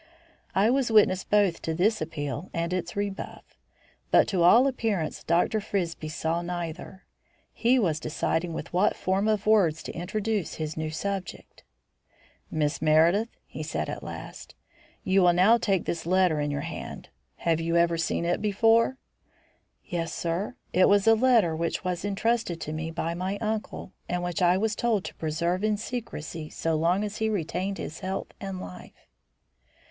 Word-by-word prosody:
I 205 +4 +4
was 265 -2 +1
witness 205 -4 +4
both 205 -5 +2
to 160 - -2
this 210 +5 +2
appeal 150 0 -4
and 170 +1 -1
its 175 -2 -3
rebuff, 200 -1 -4 0.7
but - - +5
to 185 -4 0
all 225 +10 +7
appearance 225 - -1
Dr. 175 +6 +2
Frisbie 170 -6 -3
saw 160 +2 -1
neither. 175 +1 -6 0.5
He 245 +3 +3
was 170 -10 +1
deciding 160 +2 -1
with 160 - -6
what 180 - +3
form 190 +3 0
of 215 -1 +1
words 190 -8 +3
to - - -5
introduce 205 +3 -2
his 155 -1 -4
new 155 0 -3
subject. 190 +3 -5 0.9
"Miss 150 -2 -1
Meredith," 165 +8 +4 0.2
he - - -8
said - - -3
at - - -5
last, - - -9 0.5
"you 190 +1 +3
will 175 -1 +5
now 200 +7 +5
take 195 -5 0
this 165 -1 -3
letter 180 -3 +3
in 145 0 -1
your 145 0 -2
own - - -5
hand. - - -8 0.3
Have 165 -1 0
you 165 +1 -1
ever 170 0 +3
seen 165 +1 -1
it 175 +1 0
before?" 225 +4 +3 0.9
"Yes, 165 -2 -3
sir, 175 +8 -2 0.2
it 185 - +5
was 200 -1 +4
a 225 - +7
letter 225 -8 +4
which 165 +1 -2
was 180 -1 -2
entrusted 205 -2 0
to 155 - -4
me 160 +1 -3
by 165 0 -2
my 185 +3 -3
uncle, 215 -3 -4 0.2
and 175 0 -1
which 175 +2 -2
I 180 +1 +4
was 215 +1 0
told 230 -5 0
to - - -6
preserve 170 +4 -1
in 215 -1 +2
secrecy 185 -9 -6
so 165 - -2
long 170 +6 +2
as 210 0 -4
he 220 0 0
retained 190 0 -2
his 160 - -6
health 190 +1 -4
and 195 -2 -5
life." 90 - -11
180 Hz, 170 wpm, -27 LUFS, 165-210 Hz, 0.9 s, all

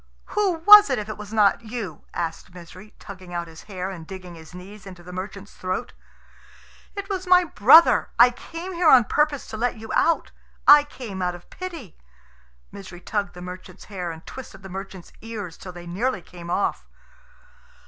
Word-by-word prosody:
"Who 410 -3 +2
was 420 0 +10
it, - - 0
if 210 0 -5
it 215 - -6
was 210 0 -9
not 210 -1 +3
you?" 220 -8 -7
asked 170 +1 -5
Misery, 180 +4 -13
tugging 185 -3 -11
out 170 0 -2
his 160 -1 -13
hair, 190 -2 -5
and 165 -4 -10
digging 185 -2 -9
his 160 -1 -13
knees 195 +2 -12
into 180 -2 -11
the 180 +1 -11
merchant's 195 +2 -7
throat. 185 0 -4 1.0
"It 400 -1 -5
was 380 -2 -4
my 360 0 +6
brother. 315 +1 +6
I 245 +1 +7
came 335 +8 -8
here 340 -2 +3
on 255 -4 +8
purpose 295 +3 0
to 220 - -6
let 240 +1 -1
you 220 0 -9
out. 335 - +1 0.4
I 290 0 +9
came 230 -9 -8
out 180 -1 -1
of 175 - -16
pity." 335 - -8 0.7
Misery 190 -3 -10
tugged 200 +1 -3
the 180 - -9
merchant's 185 +1 -10
hair, 180 -3 -4
and 165 0 -9
twisted 210 -7 -10
the 190 - -9
merchant's 190 -1 -9
ears 210 -7 -7
till 185 - -10
they 175 -1 -11
nearly 190 +3 -2
came 170 -1 -11
off. 195 - -1
200 Hz, 185 wpm, -23 LUFS, 180-250 Hz, 1.0 s, was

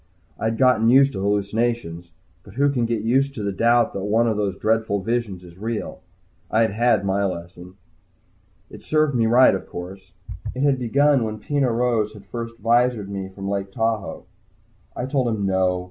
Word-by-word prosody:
I'd 110 0 -1
gotten 125 -4 +4
used 135 +2 +5
to 95 - -4
hallucinations 100 -3 -1 0.3
but 100 - -16
who 140 +2 +2
can 120 -4 0
get 115 -2 -2
used 135 +4 +1
to 105 - -5
the 100 - -1
doubt 115 +4 +2
that 95 - -4
one 110 +3 +2
of 110 - +1
those 100 -2 -2
dreadful 110 -2 0
visions 115 -5 -2
is 90 0 -15
real? 115 +1 -4 0.5
I'd 110 0 +2
had 110 -2 +2
my 100 +1 0
lesson. 90 0 -6 1.0
It - - -12
served 155 -2 +1
me 115 -2 +2
right, 125 +3 +6
of 95 - -4
course. 95 +2 -9 0.4
It 130 - -2
had 140 -2 +2
begun 140 +2 +2
when 110 -1 -4
Peno 140 +4 0
Rose 115 -3 0
had 105 -2 -14
first 115 +2 -6
visored 115 -2 +1
me 95 -1 -5
from 95 +1 -8
Lake 100 -1 -3
Tahoe. 110 -2 -2 0.7
I - - -4
had 130 +1 -5
told 130 -4 +1
him 110 -4 -1
"No." 95 -1 +1
110 Hz, 185 wpm, -22 LUFS, 100-120 Hz, 1.0 s, right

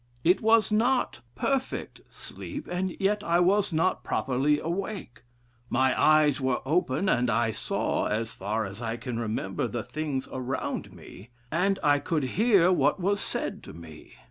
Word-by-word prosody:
It 180 +3 +4
was 225 -1 +4
not 240 - +1 0.2
perfect 270 -1 -2
sleep, - - -8
and 180 0 -3
yet 205 +1 +1
I 170 -1 +2
was 195 +3 +3
not 165 +3 +1
properly 135 +3 +1
awake. 185 - -4 0.5
My 130 0 +2
eyes 155 -2 +4
were 130 -2 +1
open, 160 +3 +1
and 125 -7 +2
I 115 +1 +1
saw, - - -1
as 110 +2 -2
far 105 +3 -2
as 100 +4 -8
I 115 0 -3
can 120 -1 -4
remember, 105 -4 -2
the 120 -2 -4
things 145 -2 -3
around 130 0 -3
me, 100 +6 -13 0.2
and 195 +4 +1
1 145 -1 +4
could 155 -1 -1
hear 195 - +3
what 150 -1 +2
was 200 +3 +1
said - - -3
to - - -11
me. 80 -1 -12
150 Hz, 160 wpm, -27 LUFS, 120-190 Hz, 0.5 s, It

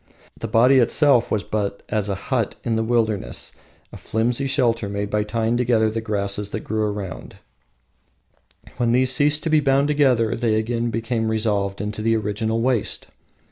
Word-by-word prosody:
The 115 - -6
body 125 +4 +5
itself 125 0 +3
was 105 -1 0
but 100 -2 -3
as 105 -1 -1
a 100 - -1
hut 115 +2 -2
in 115 -2 -1
the 110 - 0
wilderness, 110 -3 -1 0.4
a - - -8
flimsy 120 +5 -1
shelter 115 -5 0
made 100 0 -3
by 105 - +1
tying 115 +2 -1
together 115 -3 +2
the 115 +1 -3
grasses 100 -2 -2
that 110 - -4
grew 110 0 -1
around, 100 -4 -6 1.4
when 120 -1 +1
these 130 +1 +3
ceased 145 +3 +2
to 160 - -1
be 155 - +5
bound 140 0 +2
together 130 -7 +2
they 115 -2 0
again 115 +2 -1
became 115 -1 -2
resolved 105 -3 -1
into 105 +1 -4
the 115 +1 +2
original 110 +1 -1
waste. 120 -3 0
115 Hz, 170 wpm, -22 LUFS, 105-120 Hz, 1.4 s, body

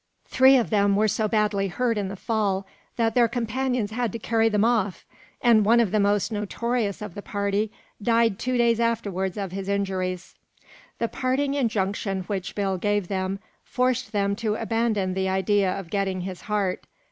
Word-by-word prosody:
Three 265 +1 +6
of 235 - 0
them 200 -1 +3
were 215 +2 +3
so 215 +1 0
badly 210 -2 +1
hurt 235 +5 0
in 205 -2 -2
the 195 - -5
fall 200 -2 -1 0.3
that 225 -2 +1
their 240 -1 +4
companions 240 -1 -1
had 235 -1 -1
to - - -3
carry 225 0 +1
them 210 0 +2
off, 215 -6 0 0.4
and 230 -3 +5
one 230 +3 +5
of 225 -6 +2
the 215 - +2
most 205 +2 +2
notorious 210 0 -2
of 210 - -7
the 205 - -7
party 200 +1 -1 0.3
died 230 -1 +2
two 255 +1 -1
days 235 -1 +3
afterwards 205 -5 -1
of 195 -3 -3
his 195 +1 -5
injuries. 185 -2 -2 0.6
The 230 - 0
parting 265 +3 -1
injunction 205 -6 -1
which 190 -1 -4
Bill 195 -2 -1
gave 205 -1 0
them 190 0 -2 0.3
forced 255 0 0
them 200 -2 0
to 215 -2 -1
abandon 225 -4 0
the 190 0 -1
idea 190 0 +2
of 185 -3 -6
getting 195 -2 -1
his 185 0 -6
heart. 200 -3 -1
210 Hz, 180 wpm, -25 LUFS, 195-230 Hz, 0.6 s, Three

